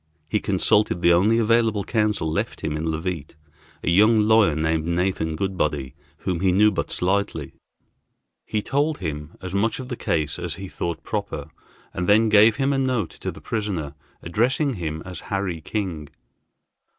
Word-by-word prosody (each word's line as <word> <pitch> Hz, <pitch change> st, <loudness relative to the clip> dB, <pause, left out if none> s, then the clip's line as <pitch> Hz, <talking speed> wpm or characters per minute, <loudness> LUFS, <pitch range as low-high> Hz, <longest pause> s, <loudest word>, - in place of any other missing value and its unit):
He 105 Hz, +6 st, 0 dB
consulted 100 Hz, -2 st, +2 dB
the 85 Hz, -, +6 dB
only 105 Hz, +7 st, +4 dB
available 115 Hz, -2 st, +2 dB
counsel 105 Hz, -7 st, 0 dB
left 80 Hz, -, -2 dB
him 75 Hz, -, -2 dB
in 80 Hz, +1 st, -3 dB
Leauvite, 80 Hz, -1 st, -3 dB, 0.5 s
a -, -, 0 dB
young 110 Hz, +5 st, +5 dB
lawyer 110 Hz, -7 st, +4 dB
named 80 Hz, 0 st, 0 dB
Nathan 85 Hz, -1 st, -1 dB
Goodbody, 75 Hz, -8 st, -1 dB, 0.3 s
whom 90 Hz, -3 st, -1 dB
he 95 Hz, 0 st, +3 dB
knew 105 Hz, +4 st, +5 dB
but 95 Hz, -, -2 dB
slightly. 90 Hz, -6 st, -1 dB, 0.9 s
He 105 Hz, -1 st, -1 dB
told 145 Hz, +3 st, 0 dB
him 75 Hz, -2 st, -5 dB
as 95 Hz, -1 st, -5 dB
much 105 Hz, +3 st, +1 dB
of 130 Hz, -1 st, -7 dB
the 125 Hz, -, -3 dB
case 75 Hz, -9 st, -1 dB
as 85 Hz, -2 st, -3 dB
he 95 Hz, +2 st, -7 dB
thought 85 Hz, -2 st, -4 dB
proper, -, -, -4 dB, 0.4 s
and 90 Hz, +1 st, -2 dB
then 110 Hz, +2 st, +5 dB
gave 110 Hz, +1 st, +6 dB
him 140 Hz, +1 st, +1 dB
a 135 Hz, -, +1 dB
note 130 Hz, -8 st, 0 dB
to -, -, -5 dB
the -, -, -13 dB
prisoner, 95 Hz, -10 st, -3 dB, 0.3 s
addressing 130 Hz, -, +1 dB
him 80 Hz, -5 st, -4 dB
as 90 Hz, -3 st, -7 dB
Harry 95 Hz, -5 st, -2 dB
King. 85 Hz, -6 st, -4 dB
95 Hz, 165 wpm, -23 LUFS, 80-110 Hz, 0.9 s, the